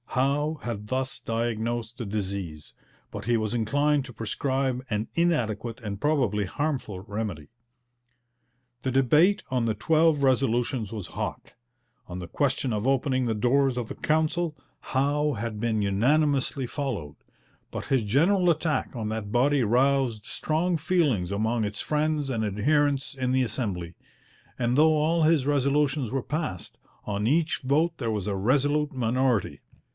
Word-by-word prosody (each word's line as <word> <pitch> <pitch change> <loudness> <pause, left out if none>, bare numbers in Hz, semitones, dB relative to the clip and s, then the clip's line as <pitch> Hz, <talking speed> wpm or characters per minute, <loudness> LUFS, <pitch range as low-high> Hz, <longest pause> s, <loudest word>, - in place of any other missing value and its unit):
Howe 145 +4 0
had 105 -3 -4
thus 130 +3 -2
diagnosed 115 0 -2
the 120 - -4
disease, 95 -7 -4 0.4
but - - -6
he 120 -1 +2
was 110 0 -1
inclined 145 +5 +1
to 130 - -9
prescribe 130 +3 -1
an 105 0 -1
inadequate 120 - 0
and 105 -2 -5
probably 130 -9 +1
harmful 125 -2 -3
remedy. 100 -7 -5 1.3
The 130 - -1
debate 150 - +4
on 125 -2 +1
the 110 - +1
twelve 155 +4 +3
resolutions 125 -3 +1
was 105 -5 -5
hot. - - -5 0.5
On 90 0 -6
the 90 - -6
question 130 +3 0
of 105 +1 -2
opening 130 -1 +1
the 115 -2 0
doors 130 +4 +2
of 120 -3 -2
the - - -7
Council, 160 +1 0 0.2
Howe 145 +2 0
had 110 -2 -4
been 110 -2 0
unanimously 135 +6 +2
followed, 120 - -4 0.5
but - - -5
his 130 -4 +1
general 175 - +3
attack 160 -3 0
on 110 -3 -3
that 110 -2 -4
body 135 +3 +3
roused 125 -1 +2
strong 160 +6 -1
feelings 150 - +1
among 110 +3 0
its 105 0 -3
friends 150 -1 0
and 115 -4 -1
adherents 140 +7 +1
in 130 -2 -2
the 130 0 +3
Assembly, 95 -9 -3 0.6
and 120 +1 +1
though 155 +1 +6
all 160 +2 +2
his 155 -4 +3
resolutions 140 -2 +1
were 135 -2 -1
passed, 150 - -4 0.3
on 105 0 -1
each 160 +4 +2
vote 155 +5 +1
there 115 -4 -1
was 105 -2 -2
a 100 - -1
resolute 145 +8 +1
minority. 125 -3 0
130 Hz, 150 wpm, -26 LUFS, 110-145 Hz, 1.3 s, though